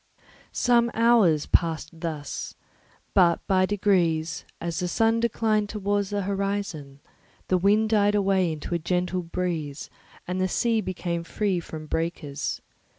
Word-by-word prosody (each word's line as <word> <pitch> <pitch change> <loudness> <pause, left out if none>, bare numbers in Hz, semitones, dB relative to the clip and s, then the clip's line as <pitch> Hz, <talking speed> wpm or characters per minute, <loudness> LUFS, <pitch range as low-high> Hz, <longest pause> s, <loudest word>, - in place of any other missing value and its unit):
Some 235 -1 +3
hours 220 -10 +4
passed 165 -1 0
thus; 155 -4 -5 0.6
but 170 -3 +4
by 185 -1 +3
degrees, 175 -6 +1
as 170 -1 -3
the 180 - -1
sun 225 +5 +2
declined 215 -2 +1
towards 205 -1 -1
the 205 -1 -1
horizon, 195 -8 -3 0.5
the 185 - +4
wind 210 +4 +3
died 205 -1 +3
away 195 -3 +2
into 155 +2 -5
a 170 - +1
gentle 180 +2 -1
breeze 165 -4 -4 0.4
and 185 +1 -2
the 185 - +2
sea 225 +4 +1
became 175 -3 -3
free 195 +1 -1
from 160 -2 -8
breakers. 155 -3 -3
185 Hz, 135 wpm, -25 LUFS, 165-205 Hz, 0.6 s, hours